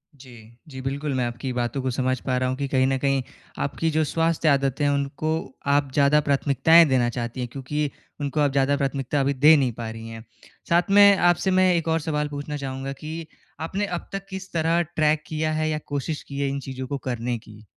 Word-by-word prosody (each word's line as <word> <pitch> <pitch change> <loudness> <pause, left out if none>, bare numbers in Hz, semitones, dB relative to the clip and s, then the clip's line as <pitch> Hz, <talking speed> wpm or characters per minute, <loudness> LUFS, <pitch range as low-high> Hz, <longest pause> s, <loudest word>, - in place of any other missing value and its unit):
जी। 130 -2 -15 0.4
जी, 130 -1 -8
बिल्कुल 140 +2 -3
मैं 125 - +1
आपकी 120 +2 -4
बातों 120 +2 -2
को 130 -1 -1
समझ 130 +1 0
पा 130 -2 0
रहा 130 0 0
हूँ 130 - -2
कि 140 -1 -2
कहीं 130 -1 +2
न 135 - +1
कहीं 135 -1 +1 0.4
आपकी 160 +3 -1
जो 155 +1 +2
स्वास्थ्य 165 +1 +1
आदतें 140 0 +1
हैं, 145 - +3
उनको 140 +1 -2
आप 140 -1 +2
ज़्यादा 145 +1 +4
प्राथमिकताएँ 145 +3 +4
देना 125 -2 +2
चाहती 120 +1 -5
हैं, 125 -1 -3
क्योंकि 145 +2 -2 0.3
उनको 145 +2 -2
आप 145 -2 +3
ज़्यादा 140 +1 +2
प्राथमिकता 140 0 -1
अभी 140 +1 +1
दे 150 +4 +6
नहीं 130 -3 +1
पा 115 -1 -6
रही 115 0 -8
हैं। 115 0 -9 0.5
साथ 175 +2 +3
में 200 0 +8
आपसे 175 +2 +2
मैं 185 -1 +4
1 165 -1 -1
और 160 0 +2
सवाल 150 -1 -1
पूछना 145 +1 -5
चाहूँगा 135 0 -5
कि 160 +3 -7 0.3
आपने 195 +6 -2
अब 175 -3 -5
तक 195 0 -5
किस 190 0 -7
तरह 165 +1 +2
ट्रैक 155 -1 +2
किया 155 0 -1
है 155 0 0
या 155 - -1
कोशिश 145 +2 -3
की 140 0 -7
है 140 - +1
इन 140 0 -3
चीज़ों 130 -1 -6
को 140 - -3
करने 120 -2 -3
की? 110 -1 -15
140 Hz, 220 wpm, -24 LUFS, 130-155 Hz, 0.5 s, में